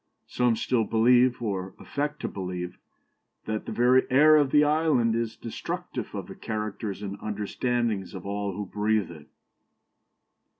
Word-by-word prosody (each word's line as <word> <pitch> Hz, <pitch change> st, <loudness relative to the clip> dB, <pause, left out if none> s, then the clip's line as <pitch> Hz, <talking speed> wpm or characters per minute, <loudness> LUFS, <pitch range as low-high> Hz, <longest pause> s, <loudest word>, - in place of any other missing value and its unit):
Some 125 Hz, -2 st, +1 dB
still 115 Hz, +1 st, +1 dB
believe, 120 Hz, +3 st, +3 dB
or 95 Hz, -3 st, -3 dB
affect 145 Hz, +1 st, -3 dB
to -, -, -2 dB
believe, 90 Hz, -2 st, -5 dB, 0.7 s
that 110 Hz, 0 st, -3 dB
the -, -, -3 dB
very 125 Hz, +2 st, +3 dB
air 150 Hz, +4 st, +6 dB
of 145 Hz, -3 st, +4 dB
the 150 Hz, +2 st, +5 dB
island 150 Hz, -6 st, +2 dB
is 115 Hz, -1 st, -2 dB
destructive 115 Hz, -, -5 dB
of -, -, -4 dB
the -, -, -9 dB
characters 105 Hz, -2 st, -4 dB
and 100 Hz, 0 st, -5 dB
understandings 110 Hz, 0 st, -2 dB
of 95 Hz, -, -8 dB
all 100 Hz, 0 st, -2 dB
who 105 Hz, +2 st, -4 dB
breathe 105 Hz, 0 st, 0 dB
it." 75 Hz, -3 st, -12 dB
110 Hz, 145 wpm, -27 LUFS, 100-125 Hz, 0.7 s, air